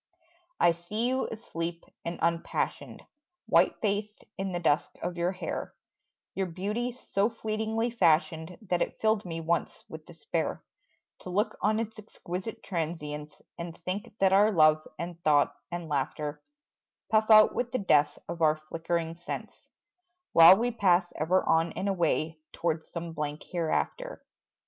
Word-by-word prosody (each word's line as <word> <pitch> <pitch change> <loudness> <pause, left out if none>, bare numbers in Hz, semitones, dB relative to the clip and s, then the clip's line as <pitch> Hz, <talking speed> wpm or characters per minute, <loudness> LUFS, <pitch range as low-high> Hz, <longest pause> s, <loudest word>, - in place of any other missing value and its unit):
I 175 - +6
see 190 +8 -3
you 260 +1 0
asleep 170 -6 -5 0.2
and 170 +1 -4
unpassioned, 170 0 -1 0.4
White - - +3
faced 210 0 -2
in 195 0 -3
the 175 - -2
dusk 160 -2 +2
of 175 +1 -3
your 175 +1 0
hair 185 - -5 0.6
Your 190 -1 -1
beauty 210 +8 -2
so 215 -4 -1
fleetingly 220 +1 -2
fashioned 165 -4 +2
That 180 -3 -1
it - - -2
filled 220 -2 +2
me 165 -2 -4
once 170 +1 -1
with - - -10
despair - - -3 0.6
To - - -9
look 205 +5 0
on 215 +1 +2
its 225 -1 -4
exquisite 210 +1 -7
transience 150 -4 -4 0.2
And 170 0 -6
think 190 +4 -5
that 190 -1 +3
our 205 +3 +6
love 155 -3 +4
and 170 0 -6
thought 145 -3 +4 0.2
and 175 -1 -4
laughter 150 +1 -2 0.7
Puff 215 0 +3
out 215 -1 +8
with 245 -1 -2
the - - 0
death 150 -8 +3
of 170 0 -6
our 155 -1 +5
flickering 165 +1 -3
sense, 175 - -7 0.6
While 165 +3 +10
we 240 +3 0
pass 180 -5 +2
ever 175 +5 +2
on 165 +1 +3
and 200 - -3
away 165 -4 0
Towards 160 -1 -2
some 170 -1 -6
blank 150 -1 -4
hereafter. 180 - -2
175 Hz, 150 wpm, -29 LUFS, 165-210 Hz, 0.7 s, While